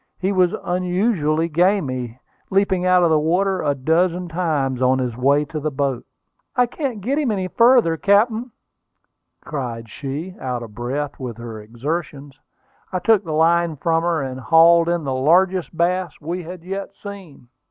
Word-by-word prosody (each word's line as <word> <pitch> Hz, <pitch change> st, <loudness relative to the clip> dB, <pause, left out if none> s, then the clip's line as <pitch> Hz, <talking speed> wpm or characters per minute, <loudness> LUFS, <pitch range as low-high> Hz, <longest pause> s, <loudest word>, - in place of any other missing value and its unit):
He 190 Hz, +2 st, -1 dB
was 185 Hz, -2 st, +2 dB
unusually 180 Hz, -3 st, 0 dB
gamy, 150 Hz, -, 0 dB, 0.3 s
leaping 190 Hz, -2 st, +1 dB
out 180 Hz, -1 st, +4 dB
of 170 Hz, -, +3 dB
the 155 Hz, -, +4 dB
water 185 Hz, +5 st, +1 dB
a 145 Hz, -1 st, 0 dB
dozen 170 Hz, +5 st, 0 dB
times 150 Hz, -7 st, -1 dB
on 130 Hz, +1 st, +3 dB
his 125 Hz, -3 st, -2 dB
way 140 Hz, +4 st, +2 dB
to 155 Hz, 0 st, -5 dB
the 155 Hz, +1 st, -2 dB
boat. 135 Hz, -3 st, -2 dB, 0.5 s
"I 250 Hz, -1 st, +4 dB
can't 245 Hz, -3 st, -4 dB
get 270 Hz, +9 st, 0 dB
him 290 Hz, -5 st, 0 dB
any 190 Hz, -4 st, -1 dB
further, 230 Hz, -6 st, +4 dB
captain!" 220 Hz, +6 st, +2 dB, 1.0 s
cried 120 Hz, -6 st, -5 dB
she, 145 Hz, -, -6 dB
out 125 Hz, -2 st, -3 dB
of 110 Hz, -2 st, -11 dB
breath 140 Hz, +5 st, -4 dB
with 125 Hz, -4 st, -6 dB
her 115 Hz, -2 st, -8 dB
exertions. 140 Hz, +4 st, -5 dB, 0.5 s
I 185 Hz, -, -1 dB
took 210 Hz, +2 st, +3 dB
the 165 Hz, -, -6 dB
line 165 Hz, +1 st, +2 dB
from 165 Hz, +3 st, 0 dB
her, 165 Hz, -3 st, 0 dB
and 130 Hz, -1 st, -5 dB
hauled 165 Hz, +4 st, +5 dB
in 170 Hz, -2 st, 0 dB
the 135 Hz, -2 st, -2 dB
largest 175 Hz, +5 st, +2 dB
bass 180 Hz, -1 st, 0 dB
we 170 Hz, +4 st, -4 dB
had 175 Hz, 0 st, -9 dB
yet 195 Hz, +2 st, -6 dB
seen. 190 Hz, -, -10 dB
165 Hz, 165 wpm, -21 LUFS, 140-185 Hz, 1.0 s, hauled